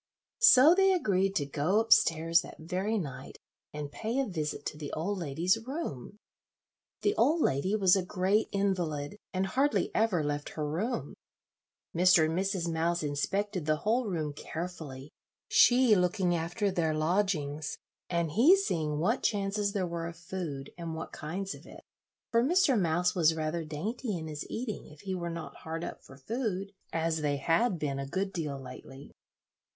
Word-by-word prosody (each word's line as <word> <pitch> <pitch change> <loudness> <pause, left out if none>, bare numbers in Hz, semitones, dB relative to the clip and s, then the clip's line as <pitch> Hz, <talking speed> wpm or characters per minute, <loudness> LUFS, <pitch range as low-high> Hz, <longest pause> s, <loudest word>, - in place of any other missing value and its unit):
So 325 - +8
they 385 +1 +4
agreed 195 - +1
to 145 - +1
go 150 +9 +1
up 225 0 +6
stairs 165 -4 +3
that - - -11
very 185 +7 -2
night 145 -10 -6 0.3
and 150 -1 -6
pay 225 - -3
a 275 - +2
visit 155 - -4
to 150 - -4
the 145 -2 -5
old 190 +5 -2
lady's 170 +6 +1
room. 225 - -5 0.9
The 410 - +3
old 315 +4 +3
lady 185 - +1
was 190 -3 +5
a 190 - +1
great 190 +3 +1
invalid, 180 -5 -1
and 185 +1 0
hardly 270 +9 +1
ever 215 -8 +2
left 145 0 -2
her 150 -1 -1
room. 170 - -2 0.8
Mr. 180 -1 +6
and 160 +1 -1
Mrs. 190 -2 -1
Mouse 170 +1 0
inspected 180 +5 -2
the 155 - +3
whole 225 +8 0
room 155 -6 -2
carefully, 155 -4 -7 0.4
she 245 -3 +6
looking 180 0 +1
after 175 +5 -1
their 160 -4 0
lodgings, 155 -3 0 0.3
and 170 -3 0
he 275 - +6
seeing 155 - -1
what 210 - +1
chances 200 0 0
there 195 -3 0
were 170 -1 -4
of 170 -1 -8
food, 170 -6 -6
and 165 -1 -4
what 160 - -6
kinds 190 +6 -4
of - - -13
it, - - -13 0.5
for 230 0 +4
Mr. 325 -1 +3
Mouse 175 -3 +2
was 165 -2 +3
rather 160 +1 -2
dainty 200 - -3
in 160 - -6
his 150 -1 -6
eating, 225 -2 -4
if 150 -1 -15
he 195 -2 -4
were 175 -2 -3
not 165 -4 -7
hard 165 +1 -5
up - - -6
for 135 - -14
food, 200 - -3 0.2
as 165 -1 0
they 145 -1 0
had 175 - +2
been 140 -3 -2
a 135 - -4
good 190 +6 -2
deal 150 -6 -3
lately. 135 +1 -11
175 Hz, 170 wpm, -30 LUFS, 155-205 Hz, 0.9 s, So